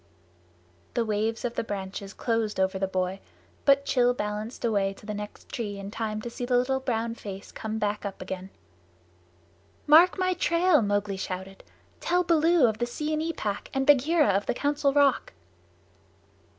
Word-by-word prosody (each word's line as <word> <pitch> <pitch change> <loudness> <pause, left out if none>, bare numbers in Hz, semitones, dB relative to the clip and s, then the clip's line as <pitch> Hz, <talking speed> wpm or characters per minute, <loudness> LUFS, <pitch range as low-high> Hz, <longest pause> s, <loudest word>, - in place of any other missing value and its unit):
The 235 - +1
waves 220 +2 -1
of 240 - -2
the - - -2
branches 195 -1 -5
closed 225 -4 -1
over 190 0 +1
the 195 - 0
boy, 185 0 -2 0.5
but 280 -1 +4
Rann 245 -1 +4
balanced 210 +2 -4
away 200 -3 +1
to - - -16
the 210 - -4
next 210 0 -8
tree 205 -4 -4
in 200 0 -7
time 215 -1 -3
to 240 - -4
see 245 - -6
the 245 0 +2
little 265 +2 +1
brown 230 -3 -1
face 200 -3 -8
come 220 0 -4
up 205 -1 -2
again. 185 0 -6 1.4
"Mark 330 +5 +7
my 370 0 +1
trail!" 340 -3 +3
Mowgli 205 -1 0
shouted. 190 0 -6 0.4
"Tell 355 +1 +1
Baloo 335 -3 +4
of 220 -2 0
the 240 - 0
Seeonee 310 +5 -2
Pack 205 -7 -4
and 270 0 +1
Bagheera 295 +2 +4
of 200 +1 +1
the - - 0
Council 285 0 +1
Rock." 280 -1 +2
225 Hz, 165 wpm, -27 LUFS, 205-280 Hz, 1.4 s, Mark